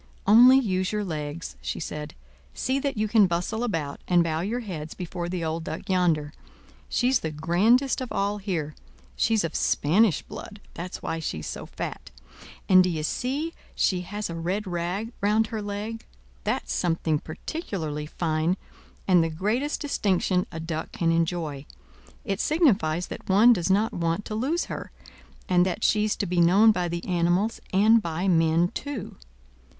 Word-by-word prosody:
"Only 245 +6 +8
use 185 -7 0
your 210 -1 -1
legs," 155 -2 -5
she - - -4
said. 150 -1 -6 0.4
"See 260 +2 0
that 275 -3 -2
you 215 +1 +1
can 210 -2 +5
bustle 180 +7 -2
about, 165 -11 -3
and 175 -1 +4
bow 160 -1 -1
your 225 +7 -2
heads 165 -8 -6
before 175 -1 -5
the 175 -2 -3
old 160 +1 -2
Duck 160 0 -6
yonder. 165 -6 +1 0.6
She's 255 +1 +2
the 160 - -3
grandest 195 - +2
of 255 - -5
all 200 +1 -1
here; 170 -7 -3 0.4
she's 220 -3 +2
of 165 -2 -3
Spanish 180 +3 +2
blood—that's 185 -4 -9
why 165 0 -2
she's 80 - -4
so - - -6
fat; - - -6 0.6
and 185 -1 +7
d'ye 165 -4 -1
see 280 - -2 0.2
she 185 -2 +1
has 205 +4 -4
a 170 - -6
red 180 +6 -2
rag 180 +5 -3
round 210 +2 +3
her 220 - -2
leg; 205 +2 -5 0.4
that's - - -1
something 165 -3 0
particularly 155 - -5
fine, 160 +2 0 0.5
and 180 -3 +5
the 165 - 0
greatest 215 - -1
distinction 190 - +1
a 165 - -6
duck 160 -1 -4
can 165 -1 0
enjoy; 165 -4 -1 0.6
it 200 -3 -2
signifies 205 - +2
that - - -9
one 215 +6 +7
does 175 -4 -1
not 205 +4 +2
want 170 +3 -1
to - - -5
lose 275 +11 0
her, - - -6 0.6
and 180 -1 +4
that 185 +4 -2
she's 215 0 +2
to - - -2
be 175 -1 +1
known 195 +6 +6
by 180 -4 -1
the 170 0 -4
animals 180 +5 +1
and 220 +4 +5
by 170 +1 -2
men 165 -1 +3
too. 280 -4 -6
185 Hz, 165 wpm, -26 LUFS, 165-215 Hz, 0.6 s, Only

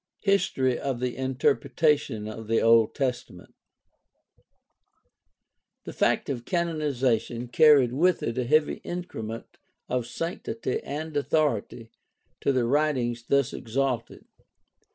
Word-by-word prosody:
HISTORY 135 -11 +1
OF 135 -3 -3
THE 125 -1 -2
INTERPRETATION 130 -1 0
OF 110 0 -8
THE 115 0 +2
OLD 115 -1 +4
TESTAMENT 125 -10 -4 2.3
The - - -8
fact - - +1
of 125 -4 -3
canonization 135 - -1
carried 140 -2 +5
with 175 +6 +2
it 115 - -2
a 125 - -1
heavy 155 +4 +2
increment 115 -11 -6 0.3
of 125 -2 -2
sanctity 165 - -4
and 155 +2 -6
authority 125 -6 -1 0.5
to - - +1
the 130 -3 +1
writings 125 -4 0
thus 140 -2 +2
exalted. 125 0 -3
130 Hz, 110 wpm, -26 LUFS, 120-150 Hz, 2.3 s, carried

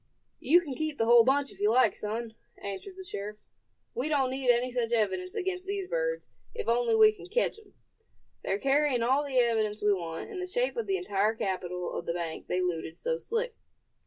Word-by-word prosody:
"You 345 +5 +5
can 295 -6 -6
keep 310 +1 -3
the 225 - +2
whole 235 0 +7
bunch 275 +3 +2
if - - -16
you 205 +1 +3
like, 235 -1 +4
son," 220 +2 -4 0.2
answered 200 - -7
the 380 - -7
sheriff; 210 - -6 0.6
"we 265 +5 -2
don't 270 -4 +2
need 260 -1 -1
any 245 +1 +3
such 240 -2 -1
evidence 190 -5 0
against 365 0 -3
these 395 -1 -2
birds, - - -2 0.3
if 465 - -4
only 235 -1 +2
we 215 -1 +7
can 215 - -12
ketch 470 +1 0
'em. 415 -3 -21 0.7
They're 195 - 0
carrying 275 0 +2
all 265 +5 +3
the 275 -3 -2
evidence 220 -4 +2
we 205 0 +4
want, 170 - -5
in 385 - -5
the 365 - -3
shape - - 0
of 465 - -3
the 385 -1 +1
entire 215 - 0
capital 180 -3 -3
of - - -5
the 170 - 0
bank 170 -2 -5
they 180 - 0
looted 165 -2 -3
so 485 0 -2
slick." 465 +1 -2
245 Hz, 210 wpm, -29 LUFS, -, 0.7 s, whole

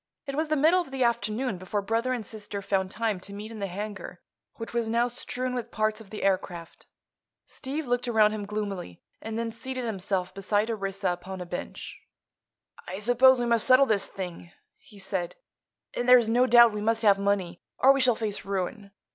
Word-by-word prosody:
It 275 - -5
was 310 +3 -1
the 310 - +1
middle 320 +6 +4
of 340 - -8
the 265 -1 -1
afternoon 235 -2 0
before 200 +2 -3
brother 230 +5 0
and 240 -4 -2
sister 205 -2 -6
found 190 -1 0
time 215 -1 -2
to 200 +2 -10
meet 210 +2 -7
in 220 - -8
the 200 - -2
hangar, 205 +3 -6 0.4
which 225 0 -8
was 235 -2 -1
now 235 +2 +2
strewn 250 +1 -3
with 245 -3 -4
parts 215 0 -1
of 210 - -14
the 215 - -6
aircraft. 180 -3 -2 0.6
Steve 285 +4 -5
looked 245 0 -1
around 220 -3 +4
him 210 -2 -5
gloomily 200 - -5 0.2
and 225 0 -5
then 230 0 -2
seated 255 +2 -5
himself 190 -4 -2
beside 205 +3 0
Orissa 195 -3 -2
upon 185 +1 -8
a 180 - -5
bench. 175 0 -7 0.9
"I 185 - -5
suppose 245 +4 +5
we 240 - 0
must 235 -2 +1
settle 260 +1 +7
this 205 -5 0
thing," 175 -2 -7 0.3
he 220 -7 -17
said; 190 -3 -3 0.6
"and 245 +1 -1
there's 245 -3 +7
no 245 +3 +3
doubt 235 -2 +7
we 210 - -3
must 225 +1 +1
have 200 -2 +5
money, 200 -4 -1 0.2
or 270 +1 +6
we 275 - 0
shall 250 -2 +4
face 215 -2 -3
ruin. 200 +1 -3
215 Hz, 195 wpm, -27 LUFS, 195-245 Hz, 0.9 s, settle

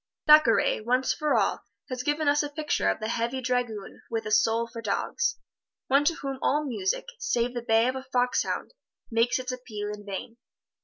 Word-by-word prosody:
Thackeray, 300 -9 +5
once 250 +4 +1
for 300 -1 0
all, - - +1 0.3
has 255 -1 -3
given 295 +3 0
us 290 +1 +4
a 295 - -3
picture 300 +1 0
of - - -1
the 215 - -3
heavy 235 +3 -1
dragoon 245 -5 -2
with 225 -1 -2
a 215 - -4
soul 225 +2 +3
for 230 0 -8
dogs 465 - -1 0.5
one 275 +2 +4
to 335 - +3
whom 270 -3 -5
all 300 +2 +1
music, 210 -8 -1
save 240 - 0
the 240 - -3
bay 225 0 +3
of 255 - -1
a 265 - -4
fox 250 0 +2
hound, - - -3 0.4
makes 230 +1 +2
its 255 0 -4
appeal 215 -5 -5
in 205 0 -9
vain. 205 +3 -6
245 Hz, 195 wpm, -27 LUFS, 225-275 Hz, 0.5 s, Thackeray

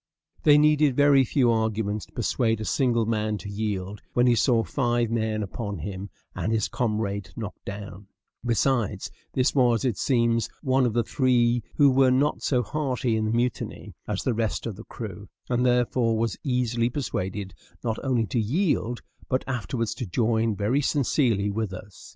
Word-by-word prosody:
They 150 -1 +6
needed 150 -2 +4
very 145 -1 +5
few 125 -1 +2
arguments 110 -2 -1
to - - -25
persuade 115 -1 0
a 110 - -4
single 120 -4 +1
man 110 -1 -1
to 100 - -9
yield 100 -1 -3
when 120 - +3
he 125 - +5
saw 115 0 +3
five 120 -3 0
men 110 -2 0
upon 100 +1 -5
him 95 +4 -6 0.2
and 110 - -2
his 110 -2 +1
comrade 105 -4 -2
knocked 105 -3 -7
down; 100 -1 -8 0.4
besides, 120 -1 0 0.2
this 130 +1 +2
was, 125 -3 +3
it 120 -5 0
seems, 115 -3 +2
one 130 -2 +3
of 115 - -2
the 120 0 +2
three 120 -1 +2
who 145 -2 +5
were 130 0 +4
not 135 +4 +2
so 125 -3 +1
hearty 125 -1 -1
in 110 0 0
the 110 - 0
mutiny 120 +1 -2
as - - -2
the 130 - +1
rest 110 -1 -1
of 115 -4 -4
the 110 - -11
crew, 105 -3 -8 0.2
and 120 0 +2
therefore 120 -2 +2
was 115 -1 0
easily 120 -3 0
persuaded 100 - -3 0.3
not 115 -2 -1
only 125 -4 +1
to 110 +4 -1
yield, 125 - 0 0.3
but 130 - +1
afterwards 115 -2 -2
to 120 -1 -5
join 110 +3 +1
very 105 +8 +1
sincerely 120 -8 +1
with 110 -1 -2
us. 95 +1 -11
115 Hz, 175 wpm, -26 LUFS, 105-125 Hz, 0.4 s, They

